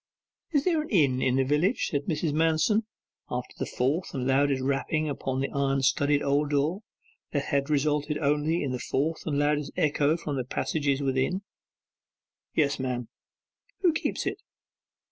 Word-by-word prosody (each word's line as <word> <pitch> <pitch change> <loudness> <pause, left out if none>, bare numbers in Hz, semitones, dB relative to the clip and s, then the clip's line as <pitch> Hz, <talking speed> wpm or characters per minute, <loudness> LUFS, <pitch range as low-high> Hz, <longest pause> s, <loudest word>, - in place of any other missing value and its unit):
'Is 290 -4 +2
there 335 -4 +2
an 305 - -7
inn 140 - +3
in 130 - +2
the 135 - +3
village?' 150 - +1
said 145 -1 -1
Mrs. 155 -1 -1
Manston, 165 +8 +2 0.4
after 125 0 -4
the - - -2
fourth 140 +9 -1
and 130 -2 -2
loudest 135 0 +2
rapping 140 +3 0
upon 135 -2 -2
the 135 - -1
iron 135 -1 0
studded 140 +2 +2
old 145 +1 +1
door 150 +7 +1 0.5
had 140 0 0
resulted 150 0 +1
only 150 +3 +1
in 135 - -2
the 125 - -3
fourth 155 +7 -1
and 145 -2 0
loudest 145 0 +1
echo 150 +1 +2
from 150 -4 -4
the 130 - -1
passages 140 +2 -1
inside. 135 +7 0 1.1
'Yes, 145 -3 +2
ma'am.' 125 -2 -3 0.7
'Who 355 -4 +4
keeps - - -2
it? - - -2
145 Hz, 160 wpm, -27 LUFS, 135-155 Hz, 1.1 s, Who